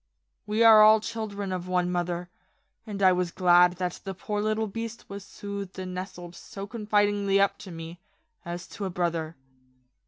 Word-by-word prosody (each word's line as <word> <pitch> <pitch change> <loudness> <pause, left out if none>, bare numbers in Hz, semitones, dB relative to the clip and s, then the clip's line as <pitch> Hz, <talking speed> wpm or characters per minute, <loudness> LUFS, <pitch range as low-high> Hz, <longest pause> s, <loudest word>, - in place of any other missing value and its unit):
We 215 +2 +2
are 220 -1 +9
all 215 +1 +8
children 210 -3 -5
of 180 -1 -4
one 180 -1 0
mother, 175 0 -2 0.6
and 200 -2 -4
I 185 - +7
was 180 -1 0
glad 175 0 +5
that 180 -1 -4
the 195 -1 -5
poor 205 +3 -3
little 215 +1 0
beast 230 +2 -6
was 200 0 -8
soothed 200 -1 -7
and 185 -1 -5
nestled 180 -2 -7
so 195 +3 -8
confidingly 205 -2 +1
up 200 0 +2
to 190 - -10
me, 165 +1 -8 0.4
as 175 +1 -6
to 205 - -6
a - - -2
brother. 170 -2 -2
195 Hz, 175 wpm, -27 LUFS, 180-210 Hz, 0.6 s, are